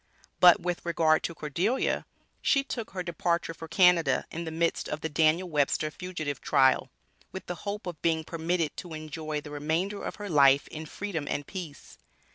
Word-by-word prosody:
But 175 -1 +8
with 175 -1 -3
regard 160 -2 +3
to 170 - -4
Cordelia: 175 - -1 0.3
she 275 -2 +3
took 235 -5 -5
her 185 -1 -4
departure 170 -1 -1
for 165 0 -9
Canada, 170 -4 +4
in 170 +1 -5
the - - -3
midst 165 +1 -1
of 150 - -4
the 160 - -2
Daniel 160 +4 +2
Webster 155 -1 +1
(fugitive) 155 -7 -5
trial, 130 -3 +3 0.4
with 190 - -7
the 180 - -3 0.2
hope 205 0 -5
of 175 -4 -6
being 160 -1 +1
permitted 165 0 -1
to 170 -3 -7
enjoy 155 -1 -5
the 150 - -10
remainder 160 +8 -1
of - - -4
her 205 -1 -7
life 140 -4 +5
in 155 0 -7
Freedom 165 -5 -4
and 145 - -2
peace. 170 -5 -9
165 Hz, 180 wpm, -28 LUFS, 155-180 Hz, 0.4 s, But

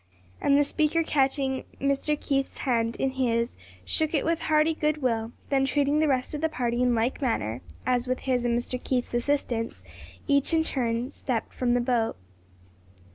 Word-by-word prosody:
And 280 0 +4
the 290 - +5
speaker 310 +3 +1
catching 270 -3 +1 0.2
Mr. 280 +2 0
Keith's 275 -2 -1
hand 230 -3 +1
in 270 - 0
his 235 -2 0 0.3
shook 315 0 0
it 290 - +1
with 330 0 +1
hearty 310 0 +3
good 305 -2 -1
will, 230 -2 0 0.2
then 270 -1 +3
treating 285 +2 +2
the 310 - +3
rest 260 -1 0
of 300 - -3
the 320 - +2
party 245 -4 -1
in 245 -1 +3
like 230 +5 0
manner, 120 - -1 0.2
as 250 0 +1
with 255 0 -1
his 250 -2 0
and 235 -1 +2
Mr. 250 +1 -4
Keith's 250 -2 -1
assistance, 240 - -1 0.4
each 280 +3 +3
in 320 - +3
turn 245 -3 -1
stepped 250 -5 -3
from 245 -1 +1
the 245 - +2
boat. 240 -2 0
260 Hz, 180 wpm, -27 LUFS, 240-290 Hz, 0.4 s, the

